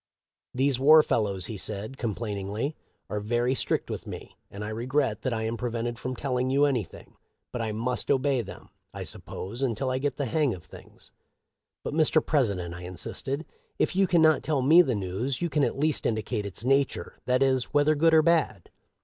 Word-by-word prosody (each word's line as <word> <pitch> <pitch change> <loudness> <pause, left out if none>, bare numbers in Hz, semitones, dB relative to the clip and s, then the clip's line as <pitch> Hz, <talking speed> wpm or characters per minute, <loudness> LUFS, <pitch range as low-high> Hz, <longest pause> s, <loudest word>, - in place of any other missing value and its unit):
' - - -66
These 135 0 +2
war 155 +3 +7
fellows,' 100 -5 0
he 110 - -5
said, 105 +5 -5
complain 110 -4 -3
ingly, 110 +9 -2 0.2
' - - -47
are 105 - -1
very 120 +4 0
strict - - 0
with - - -6
me, - - -8
and 105 +1 -7
I - - -4
regret 120 +1 -1
that 130 - -1
I 110 -1 -2
am 115 +1 -2
prevented 120 0 -3
from 130 0 -4
telling 130 -1 -1
you 140 +2 +4
anything; 125 - -3 0.3
but 120 - -3
I 110 -1 -2
must 120 +4 -2
obey 135 -1 +2
them, 105 - -11 0.3
I - - -4
suppose, 110 +7 -7
until 130 0 0
I 130 - 0
get 145 +1 -2
the 140 - -1
hang 135 -1 +1
of 85 - -13
things.' - - -14 0.4
' - - -60
But, - - -4
Mr. 155 0 +3
President,' 100 - 0
I 85 - -8
insisted, 135 - -3 0.2
' - - -38
if - - 0
you 195 0 +3
can 170 -2 +4
not 155 -3 +5
tell 145 -4 0
me 160 +6 +8
the 130 -9 0
news, 105 +7 -2
you 170 -2 -2
can 145 0 +2
at - - 0
least 155 +2 +1
indicate 110 -1 -2
its 100 +4 -5
nature, 135 +1 0
that 125 +1 +3
is, 130 -2 +2
whether 145 +2 +3
good 160 +2 +4
or 155 - +6
bad.' 170 -2 +1
130 Hz, 210 wpm, -27 LUFS, 110-145 Hz, 0.4 s, me